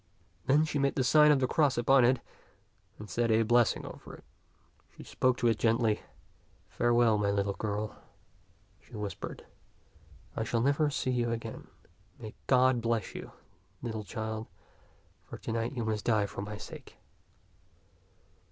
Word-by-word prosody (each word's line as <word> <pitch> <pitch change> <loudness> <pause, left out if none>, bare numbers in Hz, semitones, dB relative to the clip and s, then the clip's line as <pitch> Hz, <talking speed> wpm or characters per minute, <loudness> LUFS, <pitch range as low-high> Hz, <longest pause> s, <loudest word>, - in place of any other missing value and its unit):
Then 150 +4 +4
she 150 -2 -2
made 140 0 +1
the 130 - +1
sign 150 +4 +6
of 145 - +4
the 130 - +2
cross 145 -1 +2
upon 130 +2 +5
it 125 +1 +3 0.8
and 105 - -9
said 115 +5 0
a 110 0 +4
blessing 120 0 +2
over - - -10
it. - - -17 0.7
She - - -9
spoke 130 -1 +1
to 120 - +1
it 115 -2 +2
gently. 115 -1 +2 0.4
'' - - -35
Farewell, 120 -2 +3
my 100 -1 +1
little 100 0 0
girl," 105 +1 -4 0.8
she - - -15
whispered. 105 -4 -6 0.9
I - - -1
shall 115 +1 0
never 145 +4 +2
see 135 -2 -1
you 120 -1 0
again. 115 -1 -6 0.5
May 110 -3 -8
God 130 -1 +4
bless 115 -3 -1
you, - - -7 0.5
little 110 -3 -4
child, 110 +2 -5 0.8
for - - -7
to - - -6
night 115 +2 -2
you 120 -4 -3
must 110 -1 -2
die 110 -3 +3
for 100 - -6
my 105 +1 -6
sake." - - -11
115 Hz, 160 wpm, -30 LUFS, 110-130 Hz, 0.9 s, sign